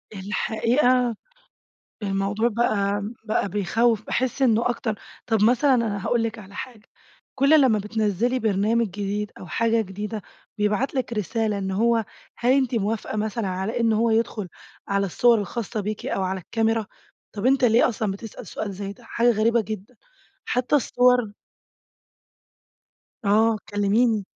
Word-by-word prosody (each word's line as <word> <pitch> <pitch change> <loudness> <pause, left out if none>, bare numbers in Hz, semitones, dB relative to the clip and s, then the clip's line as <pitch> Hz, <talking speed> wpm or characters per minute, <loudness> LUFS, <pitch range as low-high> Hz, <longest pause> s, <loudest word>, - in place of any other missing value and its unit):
الحقيقة 235 +5 +1 0.9
الموضوع 200 +3 0
بقى 205 -3 0 0.2
بقى 215 -2 0
بيخوّف، 215 +3 +1
باحس 260 +1 -1
إنّه 235 -2 +3
أكتر 230 -2 -2 0.3
طب 220 -3 +2
مثلًا 255 +4 +4
أنا 215 -5 -1
هاقول 235 -1 +2
لِك 230 0 -3
على 200 -2 -12
حاجة، 250 -4 -8 0.5
كُلّ 280 +3 +5
لمّا 250 -6 +4
بتنزّلي 215 +3 0
برنامج 220 +1 +1
جديد 205 +1 -3
أو - - -9
حاجة 230 +6 +1
جديدة 210 +1 -5 0.4
بيبعت 210 +7 0
لِك 260 -3 -2
رسالة 215 0 -1
إن 190 -1 -3
هو 225 +3 +2 0.3
هل 245 +2 +3
أنتِ 260 -2 +2
موافقة 215 0 -2
مثلًا 215 0 -2
على 190 +6 -2
إن 230 -1 +3
هو 225 +2 +2
يدخل 220 -3 0 0.4
على 200 0 +1
الصور 235 +5 +4
الخاصة 215 +2 -3
بيكِ 210 +1 -4
أو 195 - -1
على 190 0 -2
الكاميرا؟ 225 +3 0 0.5
طب 210 +2 -3
أنت 265 0 +4
ليه 230 0 +5
أصلًا 215 -4 -2
بتسأل 210 +2 -9
سؤال 205 -2 -5
زي 200 +1 -5
ده؟ 235 +4 -19
حاجة 235 +1 +2
غريبة 230 +1 +2
جدًا، 215 +2 -7 0.5
حتى 250 +4 +1
الصور 250 -4 +2 1.9
آه، 220 +2 +3
كلِّميني. 205 +1 +2
220 Hz, 145 wpm, -24 LUFS, 205-235 Hz, 1.9 s, كُلّ